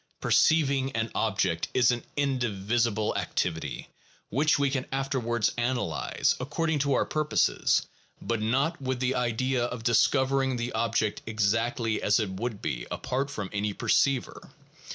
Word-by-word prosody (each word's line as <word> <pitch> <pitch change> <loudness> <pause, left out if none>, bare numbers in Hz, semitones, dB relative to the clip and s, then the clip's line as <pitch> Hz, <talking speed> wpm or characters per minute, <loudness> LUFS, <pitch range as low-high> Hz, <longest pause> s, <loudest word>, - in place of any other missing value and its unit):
Perceiving 140 -4 +3
an 115 0 -2
object 95 -6 0
is 125 -1 +5
an 120 -1 -3
indivisible 115 -5 0
activity, 80 -2 -2 0.4
which 150 +6 +3
we 140 -1 +1
can 130 -2 -2
afterwards 130 -4 0
analyze, 120 +1 0
according 155 +4 -1
to 140 0 +1
our - - +2
purposes, 155 0 +1 0.4
but 115 -2 -2
not 135 +9 0
with 130 -1 -2
the 130 0 +1
idea 125 +1 0
of 120 -1 -5
discovering 130 +2 +2
the 120 +1 -3
object 110 -2 0
exactly 115 +2 0
as 105 +2 +3
it 105 -4 -2
would 105 +2 -4
be - - -3
apart 135 +2 -2
from 105 -9 -5
any 105 0 -1
perceiver. 135 +5 0
120 Hz, 135 wpm, -27 LUFS, 110-135 Hz, 0.4 s, is